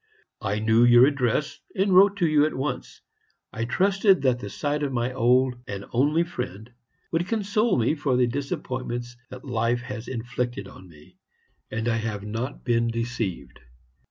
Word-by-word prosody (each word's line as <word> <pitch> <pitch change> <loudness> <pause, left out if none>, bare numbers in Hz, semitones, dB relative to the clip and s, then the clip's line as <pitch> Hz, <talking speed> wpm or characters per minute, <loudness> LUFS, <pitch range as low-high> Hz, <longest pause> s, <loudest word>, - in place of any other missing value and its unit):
I 105 -2 -1
knew 110 +2 +3
your 120 +1 +7
address, 140 0 0 0.2
and 195 0 +2
wrote 195 +2 +6
to 175 - +2
you 150 -1 +4
at - - -5
once. 135 +3 -4 0.5
I 115 - -2
trusted 195 - +3
that 125 -2 +2
the 105 - -6
sight 145 +6 -2
of 145 -2 -1
my 125 0 -1
old 130 +1 +3
and 100 0 -6
only 145 +7 +2
friend 125 - -6 0.4
would 170 +2 0
console 215 0 +1
me 120 +4 +2
for 145 -5 0
the 125 - +4
disappointments 120 -2 -4
that 130 +1 -10
life 120 -1 0
has 115 -1 -7
inflicted 120 -3 -4
on 95 -1 -14
me 85 +4 -18 0.5
and 115 +1 -3
I 115 -1 +1
have 110 -3 -4
not 110 +6 -5
been 115 -1 +2
deceived. 115 - -4
125 Hz, 165 wpm, -25 LUFS, 115-145 Hz, 0.5 s, your